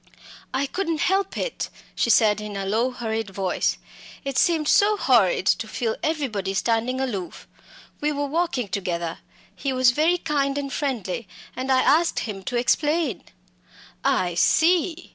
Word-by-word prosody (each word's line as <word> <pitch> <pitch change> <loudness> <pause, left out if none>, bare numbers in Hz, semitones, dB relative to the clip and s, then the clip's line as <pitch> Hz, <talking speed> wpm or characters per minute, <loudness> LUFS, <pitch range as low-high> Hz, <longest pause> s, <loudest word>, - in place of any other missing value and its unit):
"I 265 +2 0
couldn't 330 0 -2
help 390 +1 +1
it," - - -3 0.2
she - - 0
said 215 -2 +4
in 210 -1 -6
a 195 - -3
low 225 +6 +1
hurried 225 -4 -3
voice. 190 -1 -1 0.5
"It 275 -1 -3
seemed 320 -1 +2
so 415 +5 +4
horrid 220 - +3
to 220 +2 +2
feel 225 0 -2
everybody 230 - -2
standing 235 +4 0
aloof 210 -9 -4 0.5
we 300 +1 0
were 285 0 -1
walking 285 -6 -1
together 175 -3 -3 0.4
he 275 - -2
was 255 -1 +4
very 315 +7 +2
kind 285 -4 -1
and 275 -1 -3
friendly 235 -8 -3 0.3
and 260 +2 -2
I 260 0 +4
asked 330 +3 +3
him 205 -4 -5
to 245 - -2
explain." 295 +4 +1 0.8
"I 175 -1 +1
see!" 335 - +2
255 Hz, 150 wpm, -24 LUFS, 210-305 Hz, 0.8 s, said